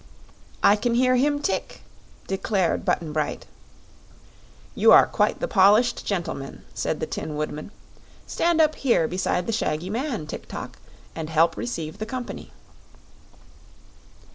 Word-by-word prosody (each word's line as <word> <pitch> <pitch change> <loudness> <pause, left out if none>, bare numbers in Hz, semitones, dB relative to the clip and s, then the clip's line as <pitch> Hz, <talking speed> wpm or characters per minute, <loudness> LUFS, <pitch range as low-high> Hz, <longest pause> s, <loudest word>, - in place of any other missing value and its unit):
"I 205 - +6
can 235 +2 0
hear 255 +1 +3
him 290 +3 +1
tick," - - -2 0.4
declared 190 -2 0
Button 155 -3 -1
Bright. 155 -1 -2 1.3
"You - - +5
are - - +9
quite - - 0
the - - -2
polished 210 +6 +4
gentleman," 170 -8 -4
said - - -2
the - - -1
Tin 155 - -5
Woodman. 150 +2 -4 0.6
"Stand 340 -1 +1
up 310 -1 +4
here 240 - +2
beside 180 0 -1
the 230 - -2
shaggy 180 -3 -2
man, 235 - -2
Tik 155 - -8
tok, - - -8 0.4
and 160 -1 -5
help 165 +1 +3
receive 160 -10 -5
the 215 - -4
company." 250 0 -6
200 Hz, 135 wpm, -24 LUFS, 160-245 Hz, 1.3 s, are